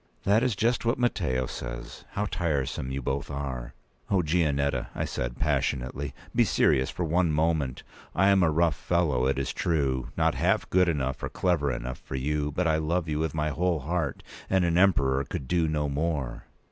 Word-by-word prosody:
"That 105 +3 +4
is 125 -4 +1
just 115 +4 +1
what 115 +2 +1
Matteo 65 - 0
says. - - -7
How 105 - -1
tiresome 70 -9 -1
you 65 0 -3
both 70 +3 -2
are!" 65 -4 -5 0.3
"O, 95 -3 +3
Gianetta," 75 -4 +1
I - - -1
said, - - -3
passionately, 70 -1 -1 0.2
"be - - +5
serious 65 0 +2
for 90 - -3
one 85 +1 +2
moment! 75 -4 0 0.3
I 95 +2 +4
am 100 -1 +5
a 85 - +4
rough 80 0 +3
fellow, 75 -8 +1
it 70 - +1
is 70 - -2
true—not 65 -7 0
half - - +1
good 90 -1 +4
enough 65 -4 -1
or - - -3
clever 80 -6 +1
enough 60 0 -4
for - - -7
you; 75 +2 -1
but 90 +5 -1
I 80 -1 +3
love 80 +2 0
you 75 -1 -1
with 80 -1 -1
my 75 0 0
whole 85 +1 0
heart, 80 -1 -2 0.3
and 95 -2 +3
an 85 -1 +1
Emperor 70 -8 +3
could 65 - -5
do 85 -2 +2
no 75 -1 0
more." 70 -3 -2
75 Hz, 185 wpm, -27 LUFS, 65-85 Hz, 0.3 s, be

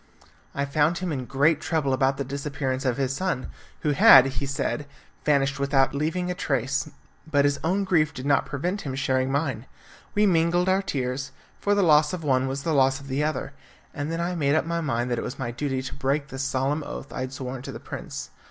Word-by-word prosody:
I 140 - 0
found 150 +4 +2
him 180 -1 -3
in 130 -4 -3
great 145 +4 +2
trouble 155 -5 0
about 135 0 +2
the 140 - -1
disappearance 140 -1 -3
of 125 -1 +1
his 135 -1 0
son, 185 -8 -2 0.3
who 150 - +1
had, 135 -2 +8
he 135 +1 -3
said, 140 +1 -2 0.4
vanished 140 -1 +2
without 140 -1 +2
leaving 165 +5 -1
a - - 0
trace; 135 -4 -1 0.4
but 145 -2 +3
his 145 0 +1
own 190 +5 +1
grief 165 -5 +2
did 130 - -7
not 140 -1 +2
prevent 180 +8 -2
him 135 -3 -4
sharing 130 -1 0
mine. 135 -4 -1 0.5
We 210 +1 +4
mingled 175 -1 +3
our 190 +1 +3
tears, 130 -6 -3 0.3
for 205 0 +2
the 200 - +3
loss 150 -2 +5
of 175 -3 -4
one 130 -2 +2
was 135 +1 -3
the 160 - 0
loss 135 -1 +3
of 140 0 -12
the 135 +3 0
other, 150 -2 -2 0.4
and 145 +2 -3
then 165 - -2
I 175 +1 -1
made 145 -4 +1
up 160 - +2
my 170 0 -1
mind 125 -5 -1
that 120 - 0
it - - -3
was 125 - -5
my 120 -3 -3
duty 130 +1 -2
to 130 - -6
break 140 +2 -1
the 135 - -7
solemn 135 +2 0
oath 145 - -7
I - - -5
had 130 0 -4
sworn 130 -1 -5
to - - -7
the - - -8
prince. - - -7
140 Hz, 225 wpm, -25 LUFS, 135-155 Hz, 0.5 s, had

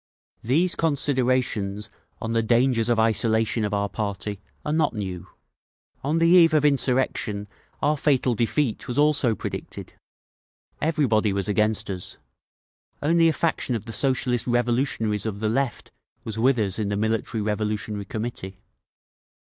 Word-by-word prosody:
"These 165 +10 +2
considerations 130 -9 0 0.3
on 115 0 -3
the 115 - +2
dangers 120 0 +2
of 120 - +2
isolation 110 0 +1
of 105 - -1
our 100 -1 0
party 100 -1 -4 0.2
are 150 - -1
not 155 -5 +1
new. 95 -4 -5 0.8
On 150 +4 0
the 165 - +3
eve 170 -2 +6
of 150 -1 +3
insurrection 130 -6 0 0.4
our 150 +1 +3
fatal 135 -4 +2
defeat 115 +2 -1
was 125 - -4
also 145 -6 +3
predicted. - - -7 0.9
Everybody 130 -9 +2
was 100 0 -2
against 105 +1 +1
us; 90 -2 -6 0.9
only 165 +2 +4
a 160 - +3
faction 145 -4 -1
of 110 -1 -5
the 115 - -6
Socialist 125 -1 +1
Revolutionaries 120 -3 0
of 100 -2 -4
the 110 0 0
left 130 +1 -2 0.3
was 110 - -5
with 125 +2 +3
us 100 -2 -1
in 105 -2 -1
the 100 - -1
Military 110 +1 -1
Revolutionary 105 -1 -2
Committee. 105 -3 -5
115 Hz, 140 wpm, -24 LUFS, 105-135 Hz, 0.9 s, eve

